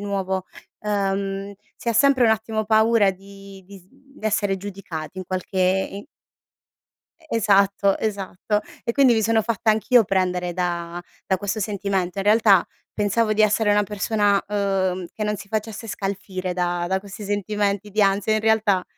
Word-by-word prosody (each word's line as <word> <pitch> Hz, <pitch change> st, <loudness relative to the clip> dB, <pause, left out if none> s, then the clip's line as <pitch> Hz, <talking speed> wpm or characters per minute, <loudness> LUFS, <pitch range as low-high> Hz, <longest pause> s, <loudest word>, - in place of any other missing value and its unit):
nuovo, 190 Hz, -2 st, -2 dB, 0.3 s
ehm, 195 Hz, -1 st, -2 dB, 0.2 s
si 235 Hz, -, -5 dB
ha -, -, 0 dB
sempre 260 Hz, +2 st, +4 dB
un 225 Hz, -, +5 dB
attimo 220 Hz, 0 st, -1 dB
paura 220 Hz, -1 st, +4 dB
di 195 Hz, 0 st, -13 dB
di 195 Hz, 0 st, -12 dB
s 180 Hz, -, -23 dB
di 275 Hz, +1 st, -10 dB
essere 205 Hz, -2 st, +1 dB
giudicati 185 Hz, -3 st, -7 dB
in 185 Hz, -, -5 dB
qualche 185 Hz, +1 st, -4 dB, 0.3 s
i 200 Hz, +1 st, -7 dB, 1.2 s
E 320 Hz, -, -21 dB
esatto, 200 Hz, -2 st, +3 dB
esatto 205 Hz, 0 st, -2 dB, 0.2 s
e 235 Hz, -, 0 dB
quindi 265 Hz, -1 st, +5 dB
mi 220 Hz, -, +2 dB
sono 225 Hz, +1 st, +2 dB
fatta 230 Hz, 0 st, +1 dB
anch'io 225 Hz, +2 st, +4 dB
prendere 180 Hz, -2 st, 0 dB
da 175 Hz, -1 st, -3 dB, 0.2 s
da 190 Hz, -, +2 dB
questo 200 Hz, +3 st, -3 dB
sentimento. 195 Hz, -3 st, -2 dB
In 195 Hz, -, -2 dB
realtà, 210 Hz, -3 st, +5 dB, 0.3 s
pensavo 215 Hz, +2 st, +1 dB
di 215 Hz, 0 st, +3 dB
essere 215 Hz, 0 st, +3 dB
una 205 Hz, 0 st, +4 dB
persona, 205 Hz, 0 st, +1 dB
uhm, 190 Hz, -3 st, -1 dB
che 215 Hz, -, -4 dB
non 210 Hz, 0 st, 0 dB
si 200 Hz, -, -11 dB
facesse 220 Hz, +1 st, -4 dB
scalfire 195 Hz, -2 st, -4 dB
da 175 Hz, -1 st, -1 dB
da 190 Hz, +2 st, 0 dB
questi 205 Hz, +1 st, -9 dB
sentimenti 205 Hz, 0 st, -1 dB
di 215 Hz, -, 0 dB
ansia 200 Hz, +2 st, +2 dB
in 215 Hz, -, +1 dB
realtà 215 Hz, -4 st, +2 dB
200 Hz, 165 wpm, -23 LUFS, 190-215 Hz, 1.2 s, un